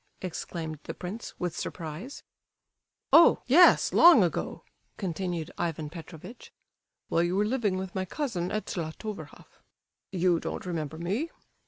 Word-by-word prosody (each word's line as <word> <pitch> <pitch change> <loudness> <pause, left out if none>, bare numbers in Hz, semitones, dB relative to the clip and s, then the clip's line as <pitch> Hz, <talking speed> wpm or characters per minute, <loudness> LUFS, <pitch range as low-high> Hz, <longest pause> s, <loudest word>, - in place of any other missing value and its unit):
exclaimed 160 -3 -5
the - - -6
prince, 195 +6 -7
with 175 -2 -2
surprise. 170 - -6 0.9
"Oh! 335 - +7
yes, 340 +8 +6
long 330 - +8
ago," 175 - -2 0.3
continued 175 -3 -3
Ivan 160 -3 -2
Petrovitch, 175 +6 -11 0.6
"while 165 - +2
you 175 +1 0
were 205 +2 +2
living 215 -5 0
with 190 -1 -5
my 190 0 -2
cousin 185 - -3
at 215 - -2
Zlatoverhoff. 185 +4 -7 0.5
You 180 -2 +2
don't - - -5
remember 160 -3 -4
me? 200 - -2
180 Hz, 130 wpm, -28 LUFS, 165-215 Hz, 0.9 s, long